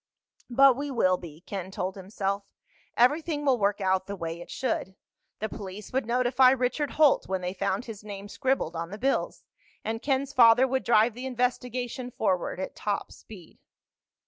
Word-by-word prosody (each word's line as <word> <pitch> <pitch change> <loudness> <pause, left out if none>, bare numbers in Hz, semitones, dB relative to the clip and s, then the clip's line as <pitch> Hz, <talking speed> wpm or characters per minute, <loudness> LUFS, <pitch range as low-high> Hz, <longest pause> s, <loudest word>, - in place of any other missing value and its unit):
But 270 +1 +6
we 285 +2 -4
will 185 -8 +2
be, 165 -3 -11
Ken 190 -1 -6
told 190 0 -3
himself. 195 +1 -3 0.5
Everything 295 +4 +2
will 260 -3 +3
work 205 0 +1
out 190 -1 +1
the 200 - -4
way 165 -2 -5
it - - -11
should. 190 -7 -2 0.4
The 220 - -3
police 205 0 -8
would 260 -3 0
notify 250 +1 +4
Richard 260 +3 0
Holt 300 -3 +4
when 190 -1 -2
they 180 0 -3
found 195 +3 -1
his 215 -3 -9
name 200 -1 -7
scribbled 255 -7 -1
on 165 0 -4
the 205 - -7
bills, 270 +5 -1 0.4
and 225 +1 -2
Ken's 275 0 0
father 245 0 +6
would 265 0 -1
drive 225 0 +4
the 250 +3 -6
investigation 250 0 -2
forward 190 -7 -1
at 190 - -5
top 205 -1 -3
speed. 185 -7 -14
225 Hz, 170 wpm, -27 LUFS, 190-255 Hz, 0.5 s, But